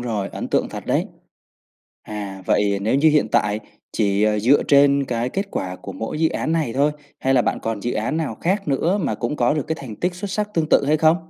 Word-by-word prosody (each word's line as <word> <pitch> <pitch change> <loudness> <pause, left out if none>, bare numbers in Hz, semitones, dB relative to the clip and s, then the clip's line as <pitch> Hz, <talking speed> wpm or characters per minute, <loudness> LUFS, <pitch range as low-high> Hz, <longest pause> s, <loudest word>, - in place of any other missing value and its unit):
rồi, 110 -5 -2
ấn - - -6
tượng - - +1
thật - - -8
đấy! - - +1 1.0
À, 100 -3 -6
vậy 100 -1 +2
nếu 110 +5 0
như 145 +4 +5
hiện 150 -7 +2
tại 105 +1 +2 0.3
chỉ, 100 -1 +1
ờ, 105 0 +2
dựa 125 +7 +4
trên 140 -1 +4
cái 120 -1 -2
kết 195 +8 -3
quả 90 0 -3
của - - -8
mỗi 115 +7 -5
dự 160 - +4
án 160 - -2
này 155 -8 0
thôi, 145 +3 +2 0.3
hay 135 0 +1
là 125 - +4
bạn - - -1
còn 110 -2 -3
dự 120 - -1
án 115 +9 -1
nào 160 -2 -2
khác 190 -1 0
nữa 165 +8 +1
mà - - 0
cũng 125 +5 -3
có 120 +4 +2
được 150 - 0
cái 160 - -1
thành 115 -6 -8
tích 180 0 -1
xuất 195 +2 -5
sắc 210 +1 -1
tương 160 -2 +1
tự - - +4
hay 155 +1 +3
không? 160 +2 +4
135 Hz, 245 wpm, -21 LUFS, 110-155 Hz, 1.0 s, như